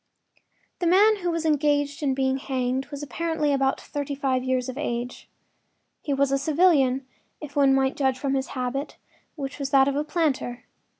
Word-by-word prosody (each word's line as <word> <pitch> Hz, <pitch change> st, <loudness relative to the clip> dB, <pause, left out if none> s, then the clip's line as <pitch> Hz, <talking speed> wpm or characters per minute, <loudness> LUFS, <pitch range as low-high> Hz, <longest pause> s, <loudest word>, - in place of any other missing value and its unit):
The 350 Hz, -, 0 dB
man 415 Hz, +5 st, +5 dB
who 355 Hz, -3 st, -2 dB
was 330 Hz, -1 st, -2 dB
engaged 290 Hz, 0 st, +1 dB
in 275 Hz, -3 st, +1 dB
being 265 Hz, 0 st, +1 dB
hanged 260 Hz, 0 st, -2 dB
was 285 Hz, 0 st, -7 dB
apparently 305 Hz, -1 st, -1 dB
about 270 Hz, 0 st, +1 dB
thirty 285 Hz, -1 st, -5 dB
five 265 Hz, -2 st, 0 dB
years 255 Hz, -1 st, 0 dB
of 255 Hz, -, -5 dB
age. 245 Hz, -4 st, -4 dB, 0.7 s
He 295 Hz, -, -4 dB
was 275 Hz, 0 st, +2 dB
a 275 Hz, -, +2 dB
civilian, 280 Hz, -4 st, +3 dB, 0.3 s
if 290 Hz, -2 st, -9 dB
one 275 Hz, -2 st, +4 dB
might 265 Hz, 0 st, +1 dB
judge 265 Hz, -2 st, +1 dB
from 275 Hz, 0 st, -2 dB
his 265 Hz, -1 st, -1 dB
habit, 255 Hz, +3 st, -3 dB, 0.4 s
which 280 Hz, -1 st, -6 dB
was 275 Hz, -1 st, -2 dB
that 270 Hz, -1 st, +5 dB
of 280 Hz, -, 0 dB
a 295 Hz, -, 0 dB
planter. 285 Hz, -7 st, -1 dB
275 Hz, 180 wpm, -25 LUFS, 265-300 Hz, 0.7 s, man